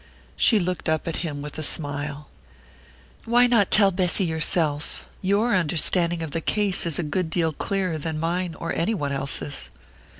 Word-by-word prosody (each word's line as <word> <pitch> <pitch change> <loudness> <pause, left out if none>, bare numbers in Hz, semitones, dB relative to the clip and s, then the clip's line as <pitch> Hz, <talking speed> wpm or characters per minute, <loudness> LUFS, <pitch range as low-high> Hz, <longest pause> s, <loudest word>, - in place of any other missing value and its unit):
She 225 - +4
looked 180 -4 -2
up 160 +1 -1
at 165 - -2
him 145 -4 -4
with 150 +1 -6
a - - -2
smile. 145 -1 -1 1.0
"Why 240 +2 +4
not 230 -5 +3
tell 200 -2 +7
Bessy 185 +1 +1
yourself? 160 -2 -1
Your 205 +5 +1
understanding 170 0 +1
of 160 - -6
the 165 - -2
case 200 -1 +1
is 160 - -2
a 175 - -1
good 160 +3 -2
deal 160 -1 0
clearer 185 0 -2
than 155 +1 -3
mine 170 +1 -2
or 165 - -4
any 180 +7 0
one 145 -6 -3
else's." 140 +1 -3
165 Hz, 170 wpm, -24 LUFS, 155-185 Hz, 1.0 s, tell